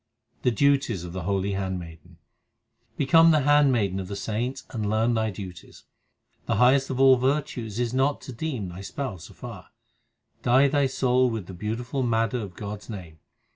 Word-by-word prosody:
The 125 - +3
duties 130 - +2
of 85 -1 -7
the 95 - -4
holy 100 0 0
handmaiden: 90 -3 -5 0.8
Become 165 +4 +6
the 155 -2 +4
handmaiden 130 -9 +3
of 95 - -5
the 100 - -5
saints 115 +6 -3
and 110 -4 -2
learn 110 +3 +2
thy 110 -1 0
duties: 90 -4 -10 0.6
The - - +1
highest 130 +4 +4
of 130 -1 -3
all 135 -1 +7
virtues 125 -5 -1
is 120 -1 -1
not 135 +2 +1
to 130 - -8
deem 120 - -4
thy 90 +2 -8
Spouse 100 - -6
afar. - - -10 0.7
Dye 130 +3 +4
thy 140 -1 +2
soul 130 -1 +2
with 110 -5 -4
the 95 - -9
beautiful 115 +8 -3
madder 115 -1 +1
of 100 -5 -7
God 105 0 -6
s - - -17
name. 90 -7 -8
115 Hz, 175 wpm, -26 LUFS, 100-130 Hz, 0.8 s, all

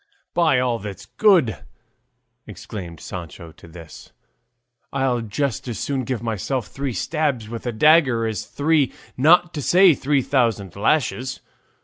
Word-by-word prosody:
"By 165 -6 +3
all 125 -2 0
that's 100 -1 -8
good," 175 - +3 0.9
exclaimed 85 -6 -8
Sancho 85 -1 -8
at 80 - -20
this, 80 -2 -12 0.8
"I'll 130 -3 0
just 125 +4 -3
as 120 - -4
soon 135 -3 -2
give 120 -2 -3
myself 115 +2 -2
three 135 -2 -4
stabs 145 -6 -1
with 115 +2 -7
a - - 0
dagger 130 -2 +4
as 110 -4 -4
three, 145 -2 +1 0.2
not 170 +6 +4
to 150 - -4
say 180 +4 +5
three 140 -1 0
thousand, 115 - 0
lashes. 130 +3 0
125 Hz, 135 wpm, -22 LUFS, 110-145 Hz, 0.9 s, say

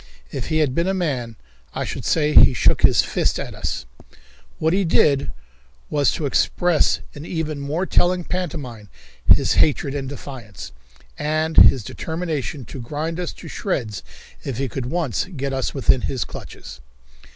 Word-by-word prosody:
If 130 - -4
he 155 - 0
had 150 -5 +2
been 170 +5 0
a 190 - +1
man 130 -10 -2 0.4
I - - -2
should - - -5
say 150 -1 +2
he 130 - +7
shook - - +3
his - - +5
fist - - 0
at - - -5
us. - - -4 0.7
What 160 +2 +1
he 195 +1 +2
did 145 -5 +3 0.6
was 145 -3 +3
to 155 - -3
express 170 +4 +2
in 145 - -9
even 155 -3 -3
more 150 +6 -2
telling 180 -1 +2
pantomime 135 - -5 0.4
his - - +5
hatred 140 -2 +2
and 135 -2 -3
defiance, 125 - -9 0.5
and 155 +1 0
his 125 - +7
determination 155 - -4
to 130 - -8
grind 155 +7 -4
us 180 - -3
to - - -11
shreds 120 - -3 0.4
if 135 -5 -4
he 135 +1 -1
could 125 0 -4
once 160 - -1
get 140 -7 -4
us 130 +1 -2
within 130 -1 +3
his 130 - -2
clutches. - - -10
145 Hz, 160 wpm, -22 LUFS, 130-165 Hz, 0.7 s, he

